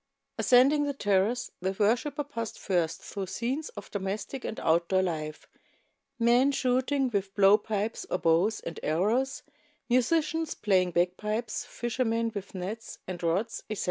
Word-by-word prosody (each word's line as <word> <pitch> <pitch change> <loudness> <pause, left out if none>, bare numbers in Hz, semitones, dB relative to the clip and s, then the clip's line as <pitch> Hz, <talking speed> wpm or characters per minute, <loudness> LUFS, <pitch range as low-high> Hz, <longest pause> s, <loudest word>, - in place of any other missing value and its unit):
Ascending 275 +4 +5
the 285 -1 -2
terrace, 205 +2 +1
the 190 +1 -1
worshiper 245 +9 +1
passed 230 -6 -5
first 170 -4 -1
through 195 -2 -5
scenes 260 - -2
of 205 - -8
domestic 205 +6 -4
and - - -4
outdoor 170 +3 +2
life, 155 -4 -4 0.7
men 245 +4 +4
shooting 260 0 +1
with 195 -2 -2
blow 200 0 +7
pipes 215 0 -2
or - - +1
bows 175 +6 +2
and 165 - -6
arrows, 220 - 0 0.5
musicians 320 +5 +1
playing 185 -3 +2
bagpipes, 210 +6 -1
fisher 240 +2 -2
• - - 0
men 230 0 0
with 200 -2 -7
nets 205 +5 -5
and 180 -1 -6
rods, 180 +7 -1
etc. 215 -3 -3
215 Hz, 145 wpm, -28 LUFS, 190-250 Hz, 0.7 s, blow